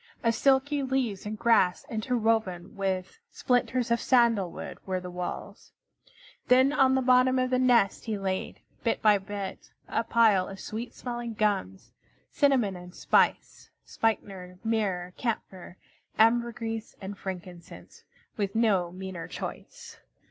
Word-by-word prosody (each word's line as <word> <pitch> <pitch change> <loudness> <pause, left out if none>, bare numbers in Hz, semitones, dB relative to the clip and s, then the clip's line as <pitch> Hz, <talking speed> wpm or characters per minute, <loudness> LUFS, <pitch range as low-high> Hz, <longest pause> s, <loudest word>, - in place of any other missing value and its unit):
Of 230 -1 +3
silky 275 +4 +2
leaves 255 -7 -1
and 215 +1 -4
grass 210 -6 +3
interwoven 220 -6 -1
with 190 - -3
splinters 245 -1 0
of 235 - +2
sandal 230 -8 +3
wood - - -8
were 185 -1 -2
the 180 0 -8
walls. 180 0 -7 0.7
Then 260 +3 +5
on 265 -3 +4
the 265 - +1
bottom 255 +1 +4
of 255 0 0
the 255 - +2
nest 240 -6 +3
he 220 -3 -2
laid, 190 -1 -3 0.2
bit - - 0
by 210 -2 +5
bit, 195 0 -7 0.2
a 230 - -1
pile 220 -5 +3
of 195 0 -9
sweet 225 +5 -6
smelling 240 -2 -5
gums, 200 - -1 0.4
cinnamon 255 -9 +2
and 180 0 -11
spice, - - +1 0.2
spikenard, 190 -5 -2
myrrh, 195 -6 -1
camphor, 190 -7 -4 0.4
ambergris, 225 -1 +1
and 195 +1 -6
frankincense, 180 -3 -9 0.3
with 200 0 -2
no 200 -7 +2
meaner 185 -1 -7
choice. 475 -1 -8
220 Hz, 135 wpm, -28 LUFS, 190-245 Hz, 0.7 s, Then